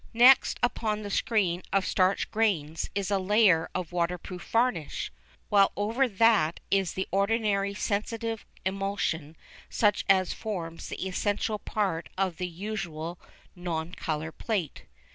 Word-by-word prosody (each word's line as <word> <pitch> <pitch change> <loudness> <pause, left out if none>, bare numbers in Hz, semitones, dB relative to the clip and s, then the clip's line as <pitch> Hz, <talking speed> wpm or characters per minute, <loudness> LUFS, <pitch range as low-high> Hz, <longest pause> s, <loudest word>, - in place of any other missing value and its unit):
Next, 250 +3 +6
upon 215 -3 0
the 205 - -5
screen 190 -6 +1
of 195 -1 +2
starch 185 +1 +1
grains 165 -8 0
is 200 0 -1
a 200 - +2
layer 190 -4 +4
of 180 -2 -3
waterproof 175 +1 -3
varnish, 230 - 0 0.4
while 200 -2 +5
over 225 +6 +1
that 200 -6 +3
is 195 -3 +2
the 190 - -2
ordinary 200 0 +1
sensitive 225 +2 -2 0.2
emulsion 190 -5 -2 0.3
such 210 -2 +2
as 190 -2 +4
forms 170 -6 -5
the 190 - -4
essential 205 +3 -1
part 190 -7 -2
of 190 -3 0
the 180 - -2
usual 175 -3 -5 0.4
non 175 -1 -4
colour 155 -2 -3
plate. 190 - -3
195 Hz, 130 wpm, -28 LUFS, 175-215 Hz, 0.4 s, Next